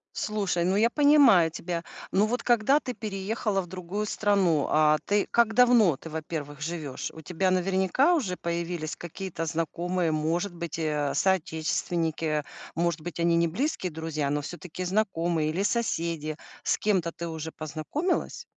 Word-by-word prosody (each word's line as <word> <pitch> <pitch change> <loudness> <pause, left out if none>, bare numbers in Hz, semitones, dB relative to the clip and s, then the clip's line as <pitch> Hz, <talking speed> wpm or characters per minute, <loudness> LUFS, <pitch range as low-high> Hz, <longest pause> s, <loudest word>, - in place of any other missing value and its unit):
Слушай, 200 -5 -1
ну 185 +2 +1
я 230 +3 +3
понимаю 280 - +6
тебя. 170 +1 -4 0.3
Ну 205 +3 +3
вот 245 +2 -2
когда 240 +4 +4
ты 250 - -5
переехала 210 0 -2
в 175 - -9
другую 185 +4 -4
страну- 195 -8 +2
а 155 0 +4
ты 205 0 +1
как 235 -2 +3
давно 235 - +5
ты, 160 - -10
во-первых, 150 -2 -5
живешь? 155 -4 -4
У 160 - -9
тебя 180 +5 0
наверняка 190 - +2
уже 200 - 0
появились 170 -2 -3
какие-то 175 -1 -5
знакомые, 165 +2 -1
может 165 +5 -1
быть, 170 -2 -5
э, 150 -3 -1
соотечественники. 160 -3 0 0.3
Может 170 -1 0
быть, 170 0 -7
они 170 0 +3
не 170 0 +3
близкие 185 - -2
друзья, 155 -2 -3
но 145 0 0
всё-таки 175 +3 -7
знакомые 175 -5 0
или 185 +5 -1
соседи. 165 -9 -1 0.3
С - - +1
кем-то 185 -5 +1
ты 170 0 -6
уже 160 0 -5
познакомилась? 155 - -3
175 Hz, 150 wpm, -27 LUFS, 160-205 Hz, 0.3 s, понимаю